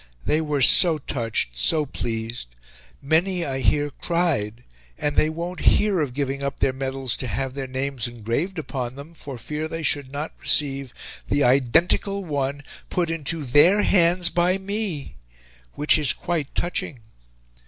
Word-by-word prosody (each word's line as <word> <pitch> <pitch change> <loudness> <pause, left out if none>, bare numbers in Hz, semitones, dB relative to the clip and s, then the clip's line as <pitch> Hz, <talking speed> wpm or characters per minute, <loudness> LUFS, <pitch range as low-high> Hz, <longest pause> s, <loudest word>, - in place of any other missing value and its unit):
They 155 - +1
were 150 -3 0
so 165 +4 +7
touched, 115 - -2
so 150 - +2
pleased; 115 - -4 0.6
many, 170 +4 +1
I 135 -2 -3
hear, 145 +5 +1
cried 135 -10 -1 0.3
and 145 0 -2
they 155 - +3
won't 170 +3 -5 0.2
hear 205 -3 +1
of 130 -5 -3
giving 140 -1 -2
up 140 0 -3
their 130 - +1
medals 135 -1 -2
to 130 - -4
have 130 +5 -3
their 135 -1 -5
names 130 -1 -2
engraved 120 - -3
upon 130 -5 -4
them 145 +4 -11
for 140 -5 -8
fear 150 +6 -4
they 165 0 -5
should 140 -2 0
not 145 +3 -5
receive 135 -3 +1 0.4
the 145 - +2
IDENTICAL 150 - +2
ONE 145 -2 -2 0.3
put 170 -2 -1
into 165 0 -2
THEIR 160 +11 +5
HANDS 175 -2 +3
BY 175 +3 +2
ME, 195 - -3 0.6
which 150 +1 +3
is 145 -4 +3
quite 165 -5 -3
touching. 155 -7 -3
145 Hz, 155 wpm, -23 LUFS, 130-170 Hz, 0.6 s, so